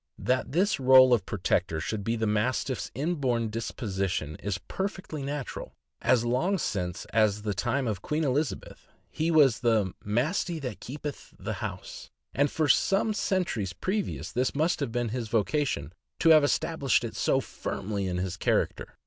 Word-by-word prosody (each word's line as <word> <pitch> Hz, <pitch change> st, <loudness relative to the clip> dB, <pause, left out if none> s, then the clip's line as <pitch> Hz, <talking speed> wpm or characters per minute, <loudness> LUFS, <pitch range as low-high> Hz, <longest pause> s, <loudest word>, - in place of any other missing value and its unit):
That 125 Hz, +6 st, 0 dB
this 185 Hz, +5 st, +2 dB
role 130 Hz, -1 st, +7 dB
of 105 Hz, -6 st, +1 dB
protector 90 Hz, -4 st, 0 dB
should 100 Hz, +5 st, -3 dB
be 115 Hz, +3 st, 0 dB
the 110 Hz, -1 st, -1 dB
Mastiff's 115 Hz, +4 st, 0 dB
inborn 130 Hz, -7 st, 0 dB
disposition 95 Hz, -, -3 dB
is 100 Hz, -1 st, -3 dB
perfectly 185 Hz, -, -5 dB
natural; 140 Hz, -1 st, -5 dB, 0.3 s
as 120 Hz, -2 st, +3 dB
long 145 Hz, +12 st, +1 dB
since 90 Hz, -, -3 dB
as 105 Hz, -2 st, +2 dB
the 105 Hz, -1 st, -1 dB
time 125 Hz, +4 st, -1 dB
of 105 Hz, -4 st, -2 dB
Queen 155 Hz, +6 st, -1 dB
Elizabeth 140 Hz, +1 st, -2 dB, 0.2 s
he 160 Hz, +1 st, -1 dB
was 145 Hz, -8 st, +5 dB
"the 110 Hz, -6 st, +2 dB
Mastie 155 Hz, -, 0 dB
that 135 Hz, -5 st, -5 dB
keepyth 145 Hz, +2 st, -7 dB
the -, -, -4 dB
house," -, -, -6 dB, 0.2 s
and 145 Hz, +1 st, +2 dB
for 155 Hz, +1 st, 0 dB
some 195 Hz, -, +3 dB
centuries 175 Hz, -, -1 dB
previous 195 Hz, -, -3 dB
this 125 Hz, +3 st, 0 dB
must 160 Hz, +4 st, +1 dB
have 140 Hz, -5 st, -2 dB
been 120 Hz, -1 st, -1 dB
his 120 Hz, 0 st, -3 dB
vocation, 110 Hz, -, 0 dB, 0.2 s
to 165 Hz, -, +3 dB
have 155 Hz, -2 st, +8 dB
established 145 Hz, -2 st, +1 dB
it -, -, -5 dB
so -, -, +2 dB
firmly 100 Hz, -1 st, -4 dB
as 90 Hz, -1 st, -2 dB
his 90 Hz, -1 st, -3 dB
character. -, -, -1 dB
125 Hz, 160 wpm, -28 LUFS, 105-150 Hz, 0.3 s, have